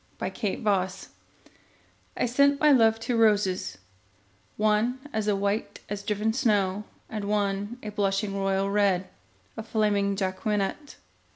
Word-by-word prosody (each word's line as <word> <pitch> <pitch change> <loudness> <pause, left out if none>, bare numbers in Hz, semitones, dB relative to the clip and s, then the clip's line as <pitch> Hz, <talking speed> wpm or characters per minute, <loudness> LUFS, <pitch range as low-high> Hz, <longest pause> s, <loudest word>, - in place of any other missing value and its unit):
The - - -2 0.3
White - - -10
Flag 190 -3 +2 1.3
I - - +1
sent 280 +4 +3
my 300 -1 +5
love 225 -4 +5
two 235 +2 -2
roses, 200 - +2 0.8
one 215 +4 +2 0.2
As 215 -1 0
white 200 +2 -1
as 205 0 -4
driven 210 +2 -1
snow, 210 -5 +1 0.2
And 215 -2 -5
one 205 +2 -1
a 210 - -4
blushing 200 0 -1
royal 195 0 0
red, 195 -3 +2 0.5
A 225 - -5
flaming 210 -3 +1
Jacqueminot. 200 +7 -2
210 Hz, 125 wpm, -27 LUFS, 195-220 Hz, 1.3 s, my